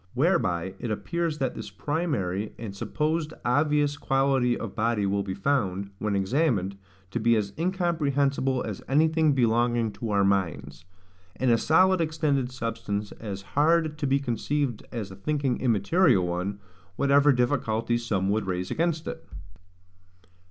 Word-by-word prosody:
Whereby 95 - +1
it 120 - -4
appears 165 - -2
that 135 -3 -1
this - - -7
primary 115 - -2
and 105 -4 -7
supposed 155 +8 -2
obvious 145 +2 +2
quality 135 -3 +1
of 110 -4 -6
body 110 -2 0
will 100 +1 +1
be 95 -1 -4
found, 100 -5 -1
when 105 -1 -1
examined, 100 - +1 0.4
to 120 - -2
be 115 +1 +3
as 105 -2 -1
incomprehensible 145 -7 0
as 105 -4 -5
anything 155 +2 +3
belonging 120 -2 +2
to 115 +2 -6
our 100 -1 +2
minds, 85 -7 -1 0.5
and 130 -1 +1
a 115 - +5
solid 185 +5 +4
extended 150 -5 0
substance 105 -4 -3
as 100 -3 -6
hard 155 +1 +2
to 145 - 0
be 135 +1 +3
conceived 135 0 -1
as 110 -5 -5
a - - -9
thinking 135 +4 -1
immaterial 115 - +3
one, 90 +3 -2 0.4
whatever 140 +3 +4
difficulties 120 -2 0
some 95 -5 0
would 105 -1 -1
raise 90 0 -2
against 165 -1 0
it. - - -6
125 Hz, 145 wpm, -26 LUFS, 100-150 Hz, 0.5 s, a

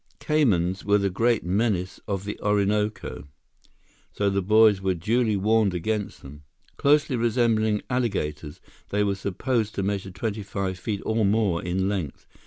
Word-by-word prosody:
Caymans 95 - +1
were 100 0 +3
the 100 -1 0
great 115 +4 +1
menace 95 -1 -1
of 100 -1 -3
the 105 - -5
Orinoco, 105 -5 -1 0.8
so 100 -1 0
the 100 0 0
boys 105 0 +5
were 95 -1 0
duly 110 +4 +1
warned 105 -1 +2
against 105 +4 -3
them. 70 +2 -11 0.3
Closely 145 -1 +3
resembling 115 -2 +1
alligators, 80 - -2 0.3
they 105 +1 +1
were 100 -1 +1
supposed 105 +4 -2
to 100 - -1
measure 100 -1 -2
twenty 105 +3 -4
five 95 -2 -4
feet 100 0 -4
or 110 0 +1
more 100 -4 +2
in 95 +2 -1
length. 95 -8 -4
100 Hz, 150 wpm, -25 LUFS, 95-110 Hz, 0.8 s, boys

